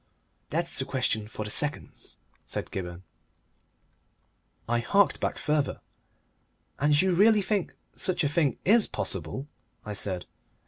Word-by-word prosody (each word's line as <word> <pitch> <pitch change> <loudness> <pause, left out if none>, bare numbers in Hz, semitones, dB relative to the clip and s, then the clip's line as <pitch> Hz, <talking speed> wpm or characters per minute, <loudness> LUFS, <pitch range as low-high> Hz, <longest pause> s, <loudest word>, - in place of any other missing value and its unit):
"That's - - -1
a - - -2
question 110 -1 -1
for 110 -1 -6
the 105 - -4
seconds," 150 +5 -1 0.3
said - - -4
Gibberne. 90 -1 -5 1.6
I 120 +1 +1
harked 200 - +3
back - - -1
further. 150 -2 0 1.0
"And 145 0 +4
you 190 0 +3
really 210 +3 +5
think 200 -2 -1 0.2
such 180 -2 +1
a - - +3
thing 145 -1 +1
IS 220 +3 +5
possible?" 95 - -3 0.4
I 105 - -4
said. 95 -3 -1
145 Hz, 130 wpm, -28 LUFS, -, 1.6 s, really